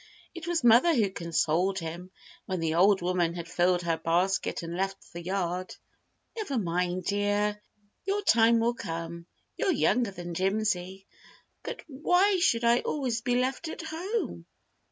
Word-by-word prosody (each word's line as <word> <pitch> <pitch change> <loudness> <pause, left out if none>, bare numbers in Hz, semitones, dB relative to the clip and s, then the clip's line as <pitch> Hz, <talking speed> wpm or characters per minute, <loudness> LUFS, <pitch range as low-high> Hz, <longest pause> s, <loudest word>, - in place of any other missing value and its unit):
It 340 -1 -8
was 345 -4 0
mother 240 +8 +6
who 210 -6 +2
consoled 170 +2 0
him 170 +1 -6 0.4
when 185 -2 -2
the 165 -1 0
old 190 +2 +4
woman 175 -2 0
had 170 -1 -6
filled 180 +1 +1
her 165 -1 0
basket 175 +3 0
and 170 +1 -5
left 195 +1 -1 0.2
the 170 - -6
yard. 185 0 -3 0.6
"Never 410 - -3
mind, 180 -2 -1
dear, 205 +1 0 0.5
your 405 +1 0
time 230 - +5
will 235 +1 +2
come. 170 -6 -6 0.3
You're - - 0
younger 250 - +2
than 175 -2 -7
Jimsy." 190 0 -1 0.6
"But - - -7
why 355 +7 +2
should 240 -10 +2
I 235 +1 +4
always 250 -6 -2
be 245 +1 0
left 260 +6 -1
at 320 - -6
home?" 320 - -4
195 Hz, 155 wpm, -28 LUFS, 175-250 Hz, 0.6 s, mother